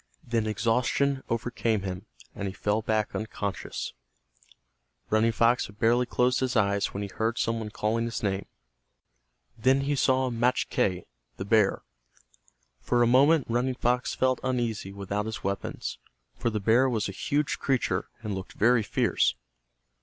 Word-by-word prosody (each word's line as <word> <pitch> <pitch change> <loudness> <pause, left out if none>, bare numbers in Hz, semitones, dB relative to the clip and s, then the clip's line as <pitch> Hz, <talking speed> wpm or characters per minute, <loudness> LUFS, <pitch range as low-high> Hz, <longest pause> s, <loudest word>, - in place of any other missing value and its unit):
Then 115 -2 0
exhaustion 125 +5 +1
overcame 115 -2 -1
him, 95 -1 -5 0.3
and 100 - -4
he 95 - -6
fell 105 +2 0
back 110 -1 0
unconscious. 105 -2 -4 1.2
Running 110 +2 +3
Fox 115 +2 +2
had 100 - -16
barely 120 +2 +3
closed 125 +1 +2
his 130 -1 -1
eyes 100 -2 +2
when 100 - -5
he - - -3
heard 115 +4 -1
some 115 0 0
one 110 -1 -5
calling 110 +2 -1
his 115 -1 -4
name. 95 -1 -1 1.1
Then 130 +4 +3
he 145 +1 0
saw 130 -1 +2
Machque, 115 -6 0 0.3
the 95 - -4
bear. 105 -1 +3 1.0
For 120 - +2
a - - +5
moment 140 +4 +5
Running 125 +2 0
Fox 125 0 0
felt 130 -1 +1
uneasy 120 -6 -1
without 100 +2 -3
his 110 - -5
weapons, 100 +1 -4 0.4
for 120 - -1
the 110 -1 -2
bear 115 +6 +4
was 110 -4 0
a - - -4
huge 145 +9 -1
creature 135 -3 0
and 105 -2 -3
looked 95 -1 -6
very 120 +1 +4
fierce. 105 - +1
115 Hz, 155 wpm, -27 LUFS, 105-125 Hz, 1.2 s, a